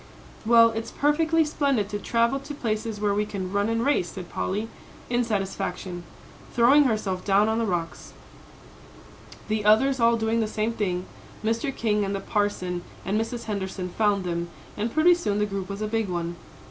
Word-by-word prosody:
"Well, 230 0 +7
it's 225 0 -4
perfectly 320 +2 +2
splendid 280 -8 0
to 205 - -3
travel 235 +5 +1
to 285 +2 -8
places 220 -4 -2
where 205 -1 +1
we 205 +1 +1
can 195 -3 -5
run 200 +2 +1
and 230 +1 0
race," 275 -12 +2
said 180 -2 -8
Polly, 210 +4 -2 0.4
in 245 0 +2
satisfaction, 195 -4 -3 0.5
throwing 270 +5 +6
herself 200 -6 -1
down 200 +1 +3
on 220 +1 +1
the 230 - 0
rocks. 170 -3 -3 1.3
The 215 -1 -1
others 250 +6 +4
all 230 0 +4
doing 225 +1 0
the 220 - +1
same 215 +2 -1
thing, 185 -5 -2 0.4
Mr. 230 +5 0
King 210 -2 +1
and 200 0 -2
the - - -2
Parson 195 -3 -1 0.2
and 210 +3 +1
Mrs. 235 +1 -4
Henderson 190 -3 -4
found 205 0 +1
them, 170 -1 -3 0.3
and 220 +2 -2
pretty 320 +5 +5
soon 320 -13 -1
the 210 - +2
group 195 -2 -4
was 200 +2 -4
a - - -1
big 225 -2 -1
one. 170 -1 -3
215 Hz, 180 wpm, -25 LUFS, 195-230 Hz, 1.3 s, Well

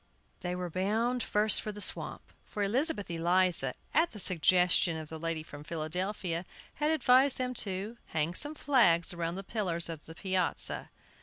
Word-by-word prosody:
They 180 -1 -4
were 180 -1 -5
bound 225 +7 -1
first 210 -1 +2
for 215 - -5
the 210 - -10
swamp, - - +3 0.2
for 205 - -4
Elizabeth 240 - 0
Eliza, 170 -5 +1 0.2
at 330 +3 +3
the 210 - -10
suggestion 180 -1 +4
of 155 -1 -8
the 160 - -7
lady 165 -1 -3
from 145 -1 -11
Philadelphia, 170 +2 -3 0.3
had 300 +1 -1
advised 275 -3 +3
them 255 -1 -2
to 200 +4 -5
hang 160 +1 -1
some 295 +10 +3
flags 190 - +3
around 170 0 -3
the 195 - -6
pillars 180 -5 -2
of 165 -2 -7
the 160 - -11
piazza. 185 -1 -2
185 Hz, 165 wpm, -30 LUFS, 165-220 Hz, 0.3 s, suggestion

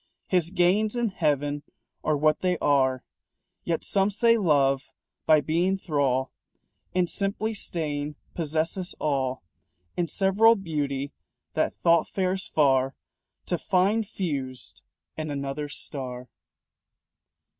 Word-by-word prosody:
His 175 -3 +1
gains 195 +5 +2
in 240 -2 +1
heaven 145 -5 0 0.4
are 155 -1 +1
what 155 +1 +3
they 180 -1 +1
are. 130 -4 +2 0.6
Yet 165 -2 -1
some 195 0 +2
say 230 +3 +4
Love 140 -8 +2 0.3
by 155 -1 +6
being 175 +6 +1
thrall 140 -7 0 0.6
And 180 -1 +3
simply 205 +4 -1
staying 150 -7 -3 0.2
possesses 165 +3 -1
all 135 -5 -1 0.5
In 175 - 0
several 200 +7 +4
beauty 145 -7 -3 0.4
that - - 0
Thought 170 -2 +4
fares 190 0 -1
far 135 -3 +2 0.5
To 175 - -1
find 200 +4 +2
fused 135 - -5 0.4
in 155 -1 -3
another 140 +1 -3
star. 125 -4 -6
155 Hz, 115 wpm, -26 LUFS, 140-190 Hz, 0.6 s, by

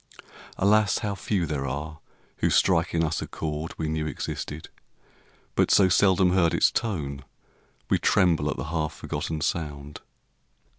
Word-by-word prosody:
Alas, 105 0 +3
how 105 -3 -2
few 95 -2 -1
There 70 -3 -3
are 75 +4 -5 0.4
who - - +1
strike 85 -2 +2
in 80 - +2
us 80 -1 -1
a - - -5
chord 80 +1 -5
we 80 - -2
knew 80 0 -2
Existed, 75 0 -5 0.8
but - - +2
so 95 -2 +5
seldom 95 0 +4
heard 85 -3 +3
its - - +4
tone 75 - -3 0.6
We - - +2
tremble 80 -5 +2
at 70 - -3
the - - -3
half 80 -2 -1
forgotten 80 +1 -4
sound. 75 -3 -3
80 Hz, 150 wpm, -26 LUFS, 75-90 Hz, 0.8 s, so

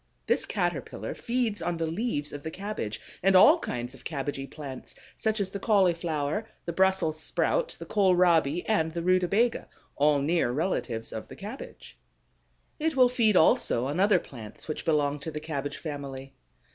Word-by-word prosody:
This - - +2
Caterpillar - - -3
feeds 235 -4 -1
on 175 -1 -1
the 165 - -1
leaves 160 -3 -2
of 145 - -6
the 160 - -5
cabbage 185 - -4 0.2
and 195 +1 +4
all 185 - +8
kinds 120 +1 -4
of 135 - -15
cabbagey 140 -2 -4
plants, 135 -4 -8 0.2
such 220 0 -1
as 195 -2 -1
the 200 - -4
cauliflower, 175 -2 +1 0.2
the 170 - -3
Brussels 190 -4 +2
sprout, - - 0
the - - -8
kohlrabi, 175 -5 +3
and 160 -7 +1
the 170 0 -3
rutabaga, 185 +6 +2 0.3
all 145 0 +4
near 155 0 +1
relatives 125 -6 -2
of - - -6
the - - -11
cabbage. - - -9 0.8
It 315 0 0
will 255 -2 +6
feed 225 -5 +3
also 125 -5 +4
on 145 +6 -2
other 200 0 +5
plants 115 -10 -9
which 155 - -4
belong 150 -3 +1
to 140 - -5
the 150 -1 -5
cabbage 145 -2 -4
family. 135 -3 -7
165 Hz, 165 wpm, -28 LUFS, 145-195 Hz, 0.8 s, all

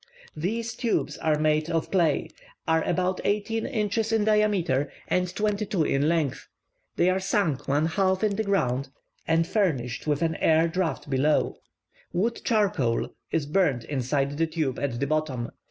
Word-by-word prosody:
These 225 +9 -2
tubes 235 -3 -1
are 155 -1 +1
made 155 +1 +1
of 165 -1 -1
clay, 170 -6 +1 0.4
are 160 0 +3
about 185 +1 0
eighteen 215 +2 0
inches 220 -2 -1
in 225 -1 +2
diameter, 205 -10 +2 0.2
and 180 0 +1
twenty 210 0 0
two 190 -6 +1
in 145 +1 +1
length; 160 -6 -1 0.5
they 175 - +3
are 185 - +1
sunk 190 - 0
one 145 +3 +2
half 190 +3 +1
in 210 -2 +2
the 220 - 0
ground, 135 - 0 0.4
and 165 0 +3
furnished 155 - -1
with 150 +2 +1
an 160 -1 0
air 160 +1 +3
draft 170 -1 -2
below. 145 +2 +1 0.6
Wood 225 +7 0
charcoal 195 - +1 0.2
is 160 -3 0
burnt 150 -6 +1
inside 140 +2 -1
the 165 - +2
tube 155 -6 -2
at 125 -4 -2
the 140 - +1
bottom. 140 -5 -1
165 Hz, 160 wpm, -26 LUFS, 145-200 Hz, 0.6 s, are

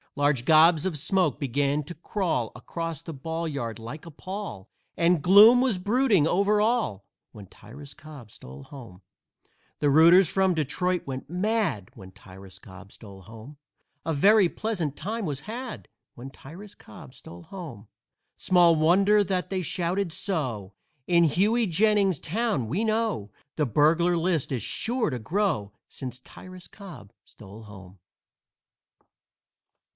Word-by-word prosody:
Large 145 -3 +1
gobs 160 +2 +5
of 180 -5 -2
smoke 180 +1 0
began 140 +2 -1
to 175 - -9
crawl 165 - -3
Across 165 -3 -6
the 165 - -8
ball 160 +4 -5
yard, 120 -8 -5
like 130 +9 -9
a 165 - -10
pall, 185 - -8 0.3
And 170 -1 +2
gloom 210 - +7
was 250 -7 +1
brooding 205 - +2
over 200 +4 +2
all 210 - -1 0.3
When 105 -3 -12
Tyrus 135 +9 -14
Cobb 150 -8 -13
stole 65 +2 -12
home. 105 - -13 0.8
The 145 -1 +2
rooters 170 +5 +6
from 190 +2 +1
Detroit 180 +4 -2
went 135 0 -6
mad 185 - -2
When 95 -1 -13
Tyrus 95 0 -15
Cobb 95 +1 -14
stole 100 -3 -14
home. 115 - -13 0.5
A 165 - -1
very 195 +5 +4
pleasant 175 -11 -4
time 220 +1 -4
was 140 -4 -4
had 235 - -8 0.3
When 125 +3 -9
Tyrus 170 +10 -13
Cobb 105 - -14
stole 85 0 -13
home. 150 - -10 0.5
Small 175 -2 +3
wonder 195 +7 +3
that 185 -2 -2
they 190 -1 -2
shouted 180 +2 -2
so; 130 - -3 0.3
In 170 -1 +4
Hughey 210 - +1
Jennings's 195 -1 +2
town, 205 - -2
we 180 - -2
know, 220 - -1 0.2
The 150 -3 0
burglar 165 +8 +2
list 165 -4 -1
is 125 -6 -2
sure 240 - -1
to 125 - -4
grow 160 - -1 0.2
Since 125 -1 -7
Tyrus 185 +7 -13
Cobb 180 - -13
stole 105 +1 -14
home. 95 -3 -14
165 Hz, 140 wpm, -25 LUFS, 125-195 Hz, 0.8 s, gloom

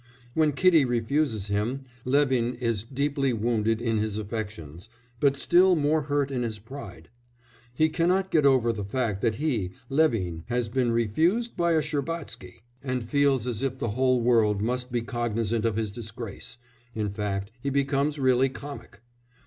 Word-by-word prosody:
When 155 -1 +2
Kitty 165 0 +5
refuses 120 -2 0
him, 110 +6 -2 0.2
Levin 130 -3 +2
is 115 -4 -1
deeply 140 +1 0
wounded 115 -1 0
in 115 -2 0
his 105 -1 -2
affections, 100 -5 -6 0.3
but 140 -1 +3
still 180 +4 +5
more 155 0 +2
hurt 145 -1 -1
in 130 -2 -1
his 115 -3 -3
pride; 130 +7 -10 0.7
he 155 +4 +4
cannot 180 +4 +1
get 155 -3 +3
over 130 -4 +4
the 105 -2 -4
fact 105 -1 -2
that 115 -3 +1
he 115 - -1 0.2
Levin 115 - +1
has 120 -1 -1
been 125 0 +1
"refused 160 - +1
by 170 -1 +2
a 160 -1 +2
Shcherbatsky," 145 - -5 0.2
and 130 -3 -3
feels 140 -2 +2
as 120 -2 -3
if 135 -1 -1
the 115 - -2
whole 130 +2 +2
world 115 -4 +3
must 125 +3 -2
be 120 -1 0
cognisant 115 -2 -1
of 115 -2 +1
his 110 -2 -2
disgrace 115 +1 -8 0.4
in 105 -2 -2
fact 100 0 -3
he 140 - -1
becomes 140 +2 0
really 130 -1 +3
comic. 140 -6 -10
125 Hz, 160 wpm, -26 LUFS, 110-140 Hz, 0.7 s, Kitty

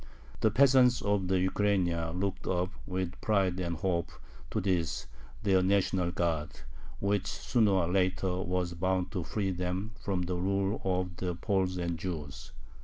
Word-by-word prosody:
The 110 - +4
peasants 125 +1 +5
of 100 -2 +1
the 95 - +2
Ukraina 90 -3 +1
looked 100 0 -2
up 90 +1 0 0.2
with 95 -1 -3
pride 95 -4 +1
and 85 -2 -2
hope 85 -1 -1 0.4
to - - -1
this 90 -5 0 0.4
their 95 -3 +4
national 95 -2 +2
guard, 85 -6 -2 0.4
which 100 0 0
sooner 115 -4 +1
or 95 -3 +2
later 90 0 +1
was 90 -1 -1
bound 90 +1 0
to 90 - -2
free 100 +2 -1
them 90 +4 -2
from 95 -3 0
the 90 0 -2
rule 100 +3 0
of 90 -2 -1
the 90 -2 -2
Poles 95 +1 0
and 85 -2 -2
Jews. 80 -7 -5
95 Hz, 155 wpm, -30 LUFS, 90-100 Hz, 0.4 s, peasants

